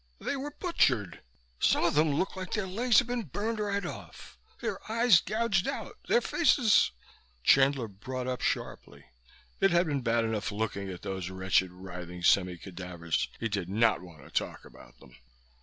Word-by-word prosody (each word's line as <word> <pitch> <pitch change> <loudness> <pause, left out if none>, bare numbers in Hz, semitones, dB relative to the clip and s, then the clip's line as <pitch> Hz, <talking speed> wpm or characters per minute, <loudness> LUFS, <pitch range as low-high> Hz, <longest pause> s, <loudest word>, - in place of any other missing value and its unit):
"They - - -2
were 275 +2 -4
butchered! 130 - 0 0.4
Some - - +3
of - - +2
them 155 +1 +3
looked 185 +6 -1
like 185 -1 -6
their 210 -3 0
legs 225 +6 +2
had 260 - +6
been 245 0 -1
burned 215 - -3
right 200 -1 -1
off. - - -9 0.2
Their - - -3
eyes 230 -5 +5
gouged 215 -3 0
out, - - -4
their 480 - +4
faces 265 - +4 0.3
" 60 -2 -33
Chandler 135 - +4
brought 125 +6 -6
up 125 -1 -3
sharply. - - -3 0.5
It 195 - +4
had 170 0 +3
been 145 -4 -1
bad 115 -1 +1
enough 110 -1 -2
looking 100 -2 -3
at 90 -2 -8
those 95 -3 -4
wretched, 95 -1 +1
writhing 90 -1 -9
semi 90 -1 +3
cadavers; 90 -2 -4
he 115 - -1
did 100 -5 -3
not 110 +3 +2
want 85 -6 -13
to - - -15
talk - - -2
about - - -16
them. 65 -3 -17
115 Hz, 175 wpm, -29 LUFS, -, 0.5 s, had